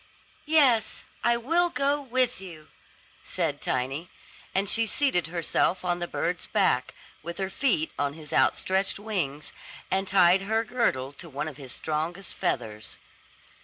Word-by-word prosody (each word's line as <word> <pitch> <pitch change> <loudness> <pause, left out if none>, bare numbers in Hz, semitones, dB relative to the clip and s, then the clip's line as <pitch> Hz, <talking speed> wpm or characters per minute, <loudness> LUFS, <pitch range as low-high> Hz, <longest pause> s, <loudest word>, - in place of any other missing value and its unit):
"Yes, 265 -8 +4 0.2
I 235 +1 +4
will 335 +9 +2
go 285 -2 +1
with 255 -5 0
you," 165 -5 -11 0.5
said 160 -5 -1
Tiny; 135 +6 -1 0.5
and 195 +1 +2
she 225 +2 +1
seated 210 - +1
herself 175 +1 0
on 175 0 +1
the 175 - -2
bird's 175 0 -2
back, 125 - +1 0.3
with 170 +2 -6
her 190 0 -2
feet 195 - +1
on 145 0 0
his 155 -1 -10
outstretched 190 +1 +2
wings, 180 -9 -3 0.4
and 195 +1 +1
tied 185 -1 +5
her 220 +3 +1
girdle 215 - 0
to 170 +4 -10
one 145 +2 -3
of 150 -4 -7
his 135 -4 -8
strongest 165 +7 -3
feathers. 110 0 -3
180 Hz, 145 wpm, -27 LUFS, 155-225 Hz, 0.5 s, tied